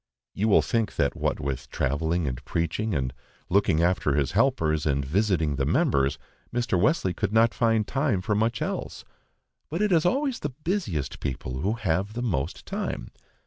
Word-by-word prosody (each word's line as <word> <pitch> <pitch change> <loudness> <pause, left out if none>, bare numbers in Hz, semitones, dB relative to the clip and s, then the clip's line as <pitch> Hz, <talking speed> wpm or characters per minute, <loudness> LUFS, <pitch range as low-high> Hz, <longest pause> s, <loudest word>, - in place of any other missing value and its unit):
You 105 - 0
will 105 - +5
think 115 -2 -1
that 70 -3 +1
what - - -1
with 70 -2 -4
travelling 80 +4 0
and 65 +1 -4
preaching, 85 - -1
and 65 -3 -1 0.4
looking 90 -4 +3
after 85 -5 +2
his 70 -2 +1
helpers, 95 - +2
and 70 -1 +1
visiting 80 -3 +1
the 70 - +1
members, 70 -1 +2 0.3
Mr. 120 -7 0
Wesley 105 - +2
could 90 - -2
not 115 +1 +4
find 115 -2 +2
time 135 -9 0
for 100 +3 -1
much 110 +2 +1
else. - - -4 0.7
But 170 +7 -1
it 210 - +1
is 165 -3 +4
always 265 +5 +1
the 150 - -2
busiest 95 - -2
people 65 -1 -4
who 100 +9 0
have 100 -2 -1
the 120 +2 -3
most 80 - -2
time. 65 - -4
95 Hz, 175 wpm, -26 LUFS, 70-115 Hz, 0.7 s, will